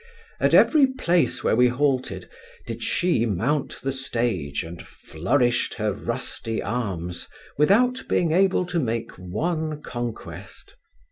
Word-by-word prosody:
At - - +3
every 295 -4 +6
place 180 -10 0
where - - +3
we 125 +2 +5
halted, 130 +1 0 0.4
did - - -6
she 170 -10 +1
mount 125 - -1
the 135 - 0
stage, 115 - -1
and 85 +1 -8
flourished 120 - -1
her - - -1
rusty 115 -1 -4
arms, 95 -7 -3 0.3
without 245 - +3
being 170 -3 +2
able 185 +1 +3
to 175 -1 -1
make 115 -4 -2
one 155 - -3
conquest. 120 -2 -7
125 Hz, 125 wpm, -24 LUFS, 110-170 Hz, 0.4 s, every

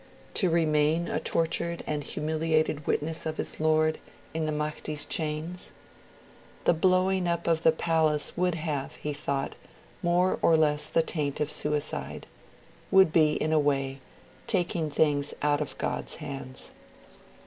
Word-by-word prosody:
to 185 - +5
remain 160 0 +2
a - - -1
tortured 170 +1 -1
and 150 -1 -2
humiliated 155 0 -1
witness 160 +2 -1
of 155 - -4
his - - -4
Lord 155 0 +2 0.3
in 160 -1 -1
the - - 0
Mahdi's 150 0 -3
chains? 160 +3 -2 0.9
The - - +5
blowing 185 +2 +2
up 170 0 -1
of 165 -1 +2
the 160 - +5
palace 160 -2 +2
would 180 -1 +1
have, 150 -4 -3
he 150 - -4
thought, 140 -1 -3 0.5
'more 175 +2 +2
or 165 - +5
less 150 -1 +2
the 165 +1 +2
taint 150 -4 -2
of 150 0 0
suicide', 150 -1 -2 0.6
would 190 -4 +5
be, 155 -2 +5
in 155 +1 0
a 155 - +4
way, 135 -2 0 0.5
taking 175 -5 0
things 145 -1 +1
out 145 0 +2
of 150 - -5
God's - - -3
hands'. 135 -4 -7
155 Hz, 145 wpm, -28 LUFS, 150-165 Hz, 0.9 s, to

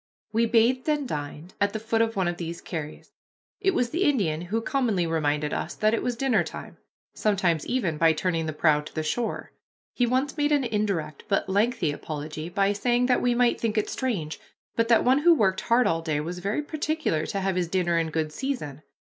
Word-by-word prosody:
We 230 +1 +3
bathed 240 +5 +3
and 295 -3 0
dined 150 +2 -6
at 200 0 +2
the 220 - -2
foot 225 +1 0
of 225 0 0
one 190 -3 +1
of 175 0 -2
these 170 0 -5
carries. 155 -3 -7 0.5
It 385 -2 +1
was 240 -1 +1
the 345 +5 0
Indian 195 - +1
who 190 +6 -2
commonly 225 -7 0
reminded 150 -2 0
us 165 - -3
that 215 +1 +2
it 230 - +1
was 245 -1 -1
dinner 265 +1 +2
time, - - -9 0.4
sometimes 185 -7 +1
even 190 -12 -1
by 165 -1 +5
turning 165 0 -1
the 155 - -3
prow 150 -1 +3
to 150 - -12
the 155 - -1
shore. 225 +9 -2 0.4
He 245 - +1
once 260 +5 0
made 295 0 +1
an 290 -2 +3
indirect, 200 - -2
but 195 - +1
lengthy 205 -3 +1
apology, 155 +2 -6
by 195 +2 +1
saying 240 +4 +1
that 250 0 +2
we 245 -1 +2
might 245 0 +2
think 225 -1 -1
it 215 - 0
strange, 185 - -2 0.4
but 230 0 +2
that 230 -1 +4
one 260 +3 +5
who 340 +2 +6
worked 190 -8 +2
hard 245 +1 +3
all 165 0 +1
day 155 -3 -1
was 170 +4 -4
very 200 +11 -1
particular 305 - -1
to 200 - -2
have 190 -1 -1
his 180 -1 0
dinner 175 -1 +1
in 165 -1 -1
good 155 -1 -2
season. 155 - -4
200 Hz, 215 wpm, -26 LUFS, 160-245 Hz, 0.5 s, who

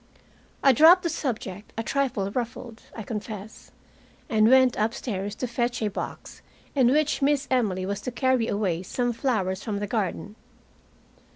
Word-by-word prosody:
I 275 - +7
dropped 330 +7 +7
the 340 - 0
subject, 215 - -4
a 225 - -1
trifle 235 -8 -1
ruffled, 235 -1 -5 0.2
I 220 - -5
confess, 210 -1 -7 0.6
and 220 0 +4
went 260 -1 +5
upstairs 210 -2 -2
to 255 - -3
fetch 240 0 -1
a 210 - +1
box - - -7 0.3
in 265 -4 +4
which 300 +2 +1
Miss 280 0 +2
Emily 200 -8 +1
was 200 +1 -3
to 250 - -4
carry 260 -2 +1
away 195 -6 -1
some 245 +6 -2
flowers 210 -7 -1
from 210 -3 -3
the 205 - -2
garden. 205 -1 -3
230 Hz, 155 wpm, -25 LUFS, 205-260 Hz, 0.6 s, I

